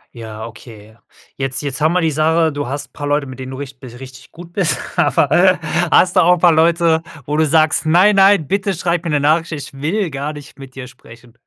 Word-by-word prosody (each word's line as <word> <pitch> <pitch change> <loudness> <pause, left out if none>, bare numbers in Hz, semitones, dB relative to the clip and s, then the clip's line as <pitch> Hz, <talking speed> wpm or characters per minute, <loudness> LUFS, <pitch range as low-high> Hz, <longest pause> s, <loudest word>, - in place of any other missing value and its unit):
Ja, 110 -1 -8
okay. 110 -2 -13 0.4
Jetzt 135 +1 -3
jetzt 140 +1 -4
haben 155 +2 +2
wir 180 - +1
die 160 -2 0
Sache, 160 +2 +1
du 145 -2 -5
hast 140 +3 -6
paar 145 - -6
Leute, 145 0 0
mit 130 -1 -10
denen 130 0 -7
du 130 - -7
richt 140 -1 -9
bi 130 - -11
richtig 130 +2 -13
gut 170 +1 -13
bist, 165 -9 0 0.2
aber 185 +1 +2 0.3
hast 180 +2 +3
du - - +5
auch 180 +1 +4
paar 175 0 +4
Leute, 165 0 +2 0.2
wo 150 - -3
du 155 0 +2
sagst: 155 +1 +2
„Nein, 185 +6 +4
nein, 195 -5 +4
bitte 195 +2 -1
schreib 175 +1 -2
mir - - -2
'ne 150 -1 +1
Nachricht, 160 +4 +1
ich 145 -1 -7
will 160 +6 -2
gar 140 +2 -4
nicht 145 -2 -13
mit 135 -2 -12
dir 135 -2 -7
sprechen.“ 120 -1 -17
150 Hz, 225 wpm, -17 LUFS, 135-170 Hz, 0.4 s, du